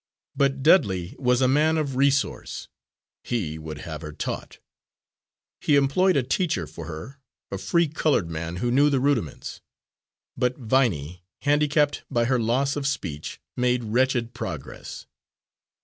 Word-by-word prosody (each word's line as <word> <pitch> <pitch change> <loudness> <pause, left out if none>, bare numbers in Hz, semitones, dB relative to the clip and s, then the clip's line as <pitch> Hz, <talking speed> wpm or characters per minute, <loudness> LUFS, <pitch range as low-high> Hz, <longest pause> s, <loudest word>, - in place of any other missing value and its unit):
But 135 -1 +1
Dudley 100 - +3
was 125 -1 +2
a - - +5
man 155 +4 +3
of 140 -4 -1
resource 140 +1 0 0.6
he 85 -10 -2
would 75 -1 -7
have 80 -2 -6
her 75 -2 -6
taught. 75 - -5 1.0
He 145 - +3
employed 145 +6 +3
a 135 - +2
teacher 130 - 0
for 80 +1 -9
her, 85 - -8 0.3
a 100 - -3
free 165 - +2
coloured 145 - +1
man 85 +1 -4
who 120 +7 -1
knew 140 +4 +5
the 140 -2 +2
rudiments. 125 - -1 0.7
But 125 0 0
Viney, 100 - 0 0.2
handicapped 145 0 +2
by 120 0 +1
her 130 +1 +2
loss 130 +5 +1
of 145 -2 -1
speech, 85 - -4 0.2
made 125 -1 +1
wretched 120 +1 +1
progress. - - -7
125 Hz, 140 wpm, -25 LUFS, 95-140 Hz, 1.0 s, a